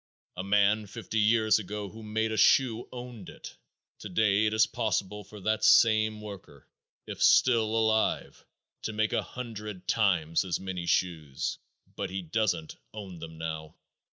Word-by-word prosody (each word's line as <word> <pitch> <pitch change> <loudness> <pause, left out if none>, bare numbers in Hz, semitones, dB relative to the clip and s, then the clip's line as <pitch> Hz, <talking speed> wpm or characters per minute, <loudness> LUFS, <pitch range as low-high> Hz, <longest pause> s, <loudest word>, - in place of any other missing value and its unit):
A 90 - -4
man 105 +2 +2
fifty 110 +1 -4
years 110 0 +4
ago 105 0 -5
who 110 +3 -11
made 110 +1 -1
a - - -1
shoe 120 0 +3
owned 120 -5 -8
it. - - -11 0.4
Today 105 +2 +2
it 110 - -1
is 110 - +5
possible 105 -3 -2
for 105 +2 -12
that 110 +2 0
same 110 -1 +5
worker, 95 -9 -11 0.4
if - - -7
still 120 -3 +5
alive, 110 -1 0 0.4
to 110 - -4
make 110 0 0
a - - +2
hundred 105 -6 -8
times 90 -7 +2
as 90 -3 -2
many 95 -2 -5
shoes, 80 -6 -1 0.4
but - - -3
he 95 0 -4
doesn't 90 -2 -1 0.2
own 95 -5 -8
them 80 0 -9
now. 80 -1 -5
105 Hz, 155 wpm, -29 LUFS, 95-110 Hz, 0.4 s, is